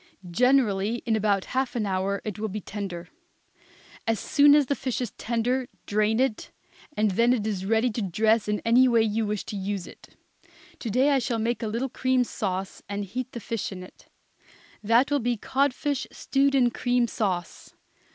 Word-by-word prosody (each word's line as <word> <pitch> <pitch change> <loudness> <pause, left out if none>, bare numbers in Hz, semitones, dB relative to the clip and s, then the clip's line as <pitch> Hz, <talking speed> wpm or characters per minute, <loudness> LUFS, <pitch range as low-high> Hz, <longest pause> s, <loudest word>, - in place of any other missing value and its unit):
Generally 235 -2 +2
in 225 -2 +2
about 205 -2 +1
half 260 -1 0
an 225 -3 0
hour 195 +1 -1
it 210 -2 -5
will 220 - -1
be 215 +1 -4
tender. 195 -4 -6 1.0
As 225 -2 +1
soon 290 +4 +5
as 295 -1 +4
the 280 - 0
fish 260 -3 -3
is 245 - -3
tender 245 +2 -1 0.2
drain 215 +2 +1
it, 260 -4 0 0.5
and 210 -1 +2
then 235 +6 +3
it 220 -4 -1
is 195 -3 -2
ready 225 +3 +2
to 225 - -3
dress 215 +4 +2
in 210 0 -1
any 245 +3 +5
way 230 -2 +4
you 220 0 0
wish 210 -1 -2
to - - -7
use 195 -1 -3
it. - - -15 0.6
To 235 - -4
day 260 +7 +3
I 275 - +3
shall 235 -1 -1
make 230 +2 -1
a 225 - -2
little 230 +5 -2
cream 255 0 +1
sauce, 190 -4 -4
and 200 0 -3
heat 250 +6 -5
the 235 - -5
fish 225 -1 -4
in 185 -1 -7
it. 185 - -16 0.8
That 230 +6 +3
will 290 - +3
be 240 -1 -1
codfish 275 +3 -1
stewed 275 0 +1
in 245 -3 +4
cream 245 -1 +1
sauce. 185 -6 -3
225 Hz, 190 wpm, -26 LUFS, 205-250 Hz, 1.0 s, soon